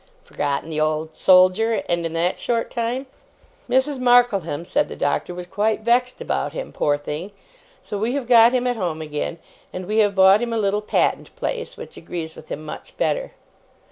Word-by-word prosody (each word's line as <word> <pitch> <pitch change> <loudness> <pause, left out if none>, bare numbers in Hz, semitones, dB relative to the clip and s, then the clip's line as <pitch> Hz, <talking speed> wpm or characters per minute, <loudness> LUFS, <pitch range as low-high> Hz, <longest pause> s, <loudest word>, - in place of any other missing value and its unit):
Forgotten 145 +3 -3
the 155 0 -1
Old 155 +1 -1
Soldier! 185 +5 +4
And 170 -1 0
in 165 - -8
that 170 +2 0
short 230 -1 -1
time! 240 +3 -2 0.6
'Mrs. 265 +2 +1
Markleham,' 240 -11 +3
said 180 - 0
the - - -7
Doctor, 145 +4 -1
'was 180 0 -6
quite 210 +4 0
vexed 245 +2 +1
about - - -2
him, - - -6
poor 145 0 +1
thing; 150 +6 -6 0.5
so 205 - -5
we 235 +5 -1
have 275 -4 -3
got 235 -1 +7
him 250 -1 0
at 245 -1 0
home 165 -6 -3
again; 150 +2 -4 0.3
and 185 0 -6
we 215 +4 0
have 205 -2 +3
bought 190 +2 +6
him 235 -1 -2
a - - 0
little 205 -1 +1
Patent 210 - 0
place, 485 0 -4
which 475 - -10
agrees 160 -2 -6
with 155 - -13
him 155 - -6
much 150 - -9
better. - - -1
205 Hz, 190 wpm, -22 LUFS, 165-240 Hz, 0.6 s, got